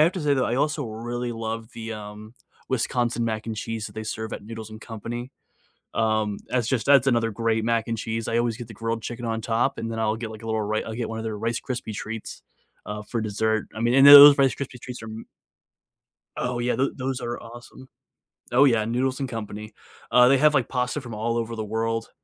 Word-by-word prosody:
have 165 +3 +4
to 185 - -4
say 145 -2 +2
though, 130 -2 +1
I 120 - 0
also 150 +1 0
really 120 +2 -4
love 115 0 -5
the, 115 -1 -6
um, 105 +1 -9 0.3
Wisconsin 120 -2 0
mac 110 -1 -3
and 110 -1 -4
cheese 110 0 -4
that 100 - -12
they 110 0 -5
serve 110 0 -5
at - - -6
Noodles 110 0 -8
and 110 0 -10
Company. 120 +3 -6 0.6
Um, 110 -2 0
that's 125 -3 0
just 120 -5 0
that's 140 -2 +6
another 115 -3 +2
great 115 0 0
mac 115 -1 +1
and 115 -1 -2
cheese, 115 +1 -3
I 115 - 0
always 120 -1 0
get 120 -2 -8
the 115 - -11
grilled 115 +1 -3
chicken 120 +2 -6
on 115 -1 -1
top, 115 +1 0
and 115 - -4
then 115 - -4
I'll 110 0 0
get 115 -1 -5
like 110 0 -10
a - - -8
little 110 -1 -1
ri 105 +1 -1
I'll 110 - -6
get 120 -1 -3
one 110 0 -4
of - - -5
their 110 -1 -3
Rice 115 +2 -1
Krispie 125 -4 -4
treats, 110 +2 -6 0.4
uh, 105 0 -5
for 115 +2 -3
dessert, 110 +1 0
I - - -5
mean 120 +1 +2
and 135 0 +7
tho 140 - +12
those 145 0 +12
Rice 135 -2 +3
Krispie 135 -3 -6
treats 125 -2 -8
are - - -7
m 110 +1 -8 1.1
Oh 125 -1 -2
yeah, 120 0 0
tho 135 +3 +1
those 130 -1 -3
are 120 0 -4
awesome. 120 +2 -12 0.7
Oh 130 +3 +6
yeah, 115 -6 +3
Noodles 130 +4 -1
and 135 - -2
Company. 105 -2 -6 0.4
Uh, 125 0 +7
they 135 - +5
have, 150 +3 +5
like, 135 -5 +1
pasta 125 +2 -1
from 120 -4 -8
all 115 +2 -1
over 115 0 -3
the 110 - -3
world, 115 +1 -2
115 Hz, 235 wpm, -25 LUFS, 110-125 Hz, 1.1 s, tho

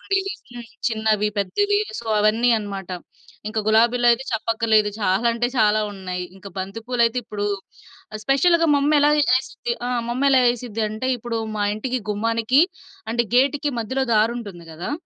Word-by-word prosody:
ఉండేయి. 390 0 -1 0.2
హ్మ్. 240 -1 -9 0.2
చిన్నవి 220 -2 +1
పెద్దవి 410 - +1 0.2
సో, 230 - -13
అవన్నీ 220 +3 +3
అనమాట. 195 -3 -6 0.6
ఇంక 220 +1 -3
గులాబీలైతే 240 +3 +3
చెప్పక్కర్లేదు 220 -1 +1
చాలా 195 +3 +1
అంటే 235 +1 0
చాలా 215 -1 +4
ఉన్నాయి. 185 -2 -5
ఇంక 195 +1 -14
బంతి 195 +4 -5
పూలయితే 240 -1 +2
ఇప్పుడు 205 -2 -4 0.8
స్పెషల్‌గా 335 +5 +3
మమ్మెలా 290 +1 +3 0.3
ఏసిద్ది 265 -2 -5 0.2
ఆహ్, 245 -1 -1
మమ్మెలా 265 +1 +3
ఏసిద్దంటే 225 -1 -4
ఇప్పుడు 235 -1 -4 0.2
మా 205 - 0
ఇంటికి 255 +3 -3
గుమ్మానికి 230 +6 +2 0.5
అంటే 235 +1 +1
గేట్‌కి 280 +3 +2
మధ్యలో 260 +4 -1
దారి 220 +2 +3
ఉంటుంది 190 -7 -9
గదా! 175 - -4
230 Hz, 135 wpm, -22 LUFS, 210-255 Hz, 0.8 s, చాలా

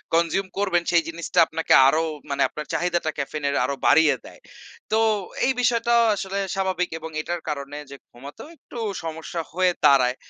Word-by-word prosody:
consume 170 +3 +1
করবেন, 185 -4 +1
সেই 170 -1 +4
জিনিসটা 170 +2 -2
আপনাকে 165 0 0
আরো 155 +4 +3 0.3
মানে 140 0 -1
আপনার 150 - -7
চাহিদাটা 175 -2 0
ক্যাফেইন 145 +2 -4
এর 140 - -1
আরো 140 +2 -2
বাড়িয়ে 160 -1 +5
দেয়। - - -13 0.5
তো 220 - +3 0.5
এই 265 - +3
বিষয়টা 235 0 +2 0.2
আসলে 195 0 -4 0.2
স্বাভাবিক 185 -2 -1
এবং 160 0 -7
এটার 175 +1 -4
কারণে 140 0 -5
যে - - -7 0.2
ঘুমাতেও 140 - -11
একটু 240 - -10 0.2
সমস্যা 160 +1 -5
হয়ে 185 +1 +2
দাঁড়ায়। 130 -2 +5
165 Hz, 165 wpm, -23 LUFS, 150-185 Hz, 0.5 s, বাড়িয়ে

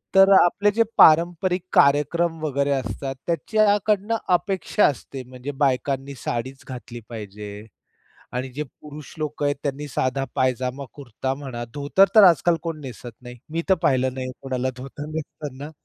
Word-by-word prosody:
तर 195 0 +8
आपले 205 +4 +2
जे 230 +3 +3
पारंपरिक 175 +3 +5
कार्यक्रम 165 +4 +3
वगैरे 140 -1 0
असतात, 135 +1 -3
त्याच्याकडनं 210 +4 +1 0.2
अपेक्षा 190 +2 +1
असते, 135 -1 -2
म्हणजे 130 +2 -7
बायकांनी 135 +1 0
साडीच 130 +2 -4
घातली 120 -2 -8
पाहिजे 105 -2 -8 0.7
आणि 125 +2 -3
जे 145 +4 -3
पुरुष 150 +2 -12
लोक 150 -1 -4
आहेत 145 0 +2
त्यांनी 145 +1 -3
साधा 130 +1 -1
पायजामा 130 +1 -1
कुर्ता 130 -1 -4
म्हणा, 130 -4 -6
धोतर 145 +7 +3
तर 215 - +9
आजकाल 175 -1 +5
कोण 165 -2 -4
नेसत 125 -3 -9
नाही, 125 0 -10
मी 165 +1 -2
तर 190 - +6
पाहिलं 130 -4 +2
नाही 130 -1 -4
आहे 130 - -5
कोणाला 130 -1 -2
धोतर 135 +3 -8
नेसताना. 145 -2 -6
140 Hz, 150 wpm, -23 LUFS, 130-165 Hz, 0.7 s, तर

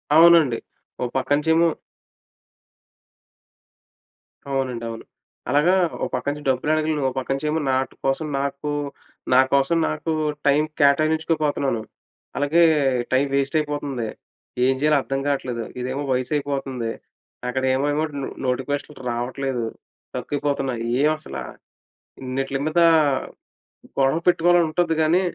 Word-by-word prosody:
అవునండి. 165 -7 +7 0.4
ఓ - - +1
పక్కంచేమో 160 +5 +3 2.8
అవునండి. 130 -3 -2
అవును. 115 0 -7 0.5
అలాగా 150 +7 +4 0.3
ఓ - - +2
పక్క 125 - -2
నుంచి 145 0 -7
డబ్బులడగలేను, 155 +3 +1
ఓ - - +2
పక్కంచేమో 135 +4 -1
నాటు 130 0 0
కోసం 135 +4 0
నాకూ 140 +1 -3 0.6
నా 130 - +7
కోసం 140 +4 +3
నాకూ 75 - -2 0.4
టైమ్ 145 +2 +4
కేటాయించుకోపోతన్నాను. 150 -3 +2 0.6
అలాగే, 145 +4 +3 0.5
టైమ్ 130 +2 +3
వేస్టయిపోతంది. 140 -3 -1 0.6
ఏం 130 - +4
జెయ్యాలో 150 0 +4
అద్దం 135 +1 -2
గాట్లేదు. 125 -4 -1 0.2
ఇదేమో 130 +3 -3
వయసయిపోతంది. 135 -2 -2 0.6
అక్కడేమో 130 +2 +1
ఏమో 150 +2 0 0.2
నొ 135 - -3 0.2
నోటిఫికేషన్లు 130 +3 -2
రావట్లేదు, 125 +1 -2 0.5
తక్కువైపోతున్నాయి 140 -4 -2 0.2
ఏవసలా, 155 +1 -1 0.8
ఇన్నిట్లి 135 +1 -2
మీదా 170 +2 +4 1.1
గొడవ 135 +3 +3
పెట్టుకోవాలనుంటది, 175 -1 +3
గానీ 165 +4 +3
140 Hz, 95 wpm, -23 LUFS, 130-155 Hz, 2.8 s, అవునండి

